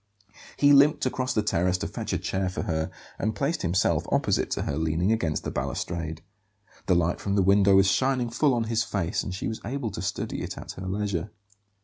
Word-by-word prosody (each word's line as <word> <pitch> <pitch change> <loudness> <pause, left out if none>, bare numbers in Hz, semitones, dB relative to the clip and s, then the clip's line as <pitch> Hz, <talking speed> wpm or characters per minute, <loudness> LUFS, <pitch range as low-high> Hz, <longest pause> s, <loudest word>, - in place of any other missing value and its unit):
He 145 0 +6
limped 145 +2 +5
across 130 0 -1
the 110 - +2
terrace 90 -2 +1
to - - -3
fetch - - -5
a - - +1
chair 95 -1 -2
for 90 - -4
her, 80 -1 -1 0.3
and 110 +1 -1
placed 140 +10 -1
himself 90 +3 +1
opposite - - +1
to - - -2
her, 70 - -2
leaning 80 +5 +1
against 85 -9 0
the - - -3
balustrade. 80 +4 -3 0.6
The 90 - +4
light 85 0 +1
from 100 0 -1
a - - +5
window 100 +1 +5
was 95 0 +6
shining 130 -1 +1
full 135 +2 +2
on 120 - +1
his 115 0 0
face; 100 -4 -1
and 95 - -5
she 95 - -4
was 110 - -4
able 125 -3 -3
to 90 - -5
study 95 +2 -3
it - - -5
at - - -7
her 95 +1 -7
leisure. 100 -1 -2
100 Hz, 215 wpm, -26 LUFS, 85-115 Hz, 0.6 s, He